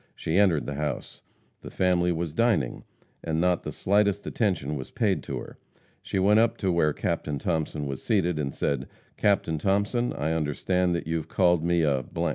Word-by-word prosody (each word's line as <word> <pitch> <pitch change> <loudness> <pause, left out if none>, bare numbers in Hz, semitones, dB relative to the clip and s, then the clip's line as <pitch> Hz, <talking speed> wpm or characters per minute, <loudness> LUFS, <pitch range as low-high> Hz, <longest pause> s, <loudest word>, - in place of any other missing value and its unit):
She 80 +4 0
entered 90 -7 +3
the 70 - -4
house. 75 +1 -4 0.4
The - - -8
family 90 -1 +2
was 85 -2 -2
dining, 110 - +1 0.4
and 80 -1 -1
not 90 0 +2
the - - -5
slightest 100 0 +1
attention 90 - -1
was 65 -2 -6
paid 100 -5 0
to - - -4
her. - - -9 0.4
She - - -3
went 105 +3 +4
up 115 0 +2
to 95 -3 0
where 85 -3 +2
Captain 75 0 -2
Thomason 80 -1 -2
was 70 -1 -5
seated, 90 -8 +1
and 70 -2 -1
said: 70 - -2 0.3
"Captain 95 -6 +1
Thomason, 100 - +1
I 80 +2 -1
understand 85 +4 0
that 85 - -3
you 80 +1 -1
have 80 - -5
called 90 -3 +2
me 85 -1 +2
a 70 -4 +1
85 Hz, 185 wpm, -26 LUFS, 75-100 Hz, 0.4 s, went